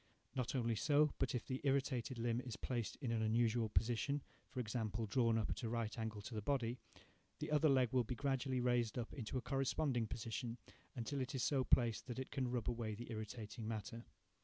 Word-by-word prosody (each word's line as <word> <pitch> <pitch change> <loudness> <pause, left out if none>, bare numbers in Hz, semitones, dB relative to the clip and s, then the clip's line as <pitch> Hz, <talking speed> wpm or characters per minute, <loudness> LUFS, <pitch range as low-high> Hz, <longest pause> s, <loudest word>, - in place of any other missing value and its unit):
Not 125 0 -1
only 120 -2 +2
so, 145 +6 +4
but 135 -1 +1
if 120 - -2
the 130 -1 -3
irritated 135 -3 +1
limb 115 +1 +1
is 125 -4 -5
placed 120 -4 -2
in 125 -4 -1
an 115 -1 +1
unusual 115 0 +3
position, 125 +6 +1 0.3
for 130 - -5
example, 110 -1 -1
drawn 115 +1 +3
up 110 - 0
at - - -3
a 115 - -2
right 115 -2 -1
angle 110 -2 -3
to 120 - -6
the 110 - -2
body, 125 0 0 0.6
the - - -4
other 150 +1 +5
leg 130 -3 +5
will 125 -1 +4
be 125 +3 -3
gradually 135 -1 0
raised 120 -2 +2
up 120 -1 -3
into 125 0 -3
a - - -1
corresponding 135 -3 +1
position, 115 +1 -3 0.4
until 135 +3 -2
it 130 +1 -3
is 130 - 0
so 135 -3 +3
placed 120 -3 +3
that 125 - -4
it 130 - -4
can 130 -3 0
rub 120 -2 -1
away 115 -3 -1
the 120 +3 -7
irritating 110 0 -5
matter. 115 +2 -4
120 Hz, 210 wpm, -40 LUFS, 115-130 Hz, 0.6 s, other